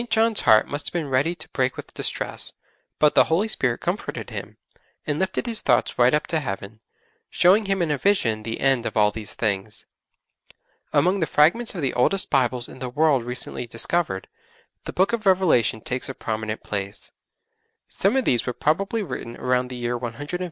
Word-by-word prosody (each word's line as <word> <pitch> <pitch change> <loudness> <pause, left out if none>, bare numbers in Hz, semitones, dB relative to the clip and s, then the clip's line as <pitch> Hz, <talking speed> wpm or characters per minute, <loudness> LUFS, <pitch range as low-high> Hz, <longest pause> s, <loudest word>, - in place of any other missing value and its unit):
John's 225 -1 +3
heart 110 0 +5
must 145 +1 -4
have - - -3
been 165 -5 -2
ready 140 +7 +1
to 165 - -6
break 130 -1 -1
with - - -9
distress, - - -2 0.4
but 150 -1 +4
the - - +6
Holy 175 +7 +1
Spirit 125 - -1
comforted - - -4
him, - - -7 0.5
and 150 0 -1
lifted 190 +4 -1
his 230 -2 +1
thoughts - - +1
right 120 +1 +6
up 150 - +2
to 160 - 0
Heaven, 105 -4 -6 0.5
showing 195 +5 +4
him 195 -2 +1
in 160 - -1
a 145 - -1
vision 115 - +2
the 115 +1 -5
end 135 -3 +2
of - - -4
all 105 -1 +4
these 105 -1 -7
things. 105 -1 -2 1.1
Among 185 +3 +2
the 165 - 0
fragments 195 +10 +3
of 170 - -4
the 135 - 0
oldest 185 +11 +1
Bibles 125 -3 +2
in - - -12
the 130 -1 -4
world 145 -1 +2
recently 125 0 -4
discovered, 115 - -1 0.6
the - - -5
Book 190 +5 +2
of 220 -3 -1
Revelation 175 - +3
takes 125 +4 -3
a 135 - -5
prominent 110 -1 -4
place. 100 0 -4 0.8
Some - - +1
of 260 - +1
these 120 0 +1
were 125 - -1
probably 195 - 0
written 120 -10 -6
about 125 0 0
the 125 - -6
year 120 0 -2
150 125 +7 -4
A.D. - - -22
135 Hz, 195 wpm, -23 LUFS, 115-180 Hz, 1.1 s, the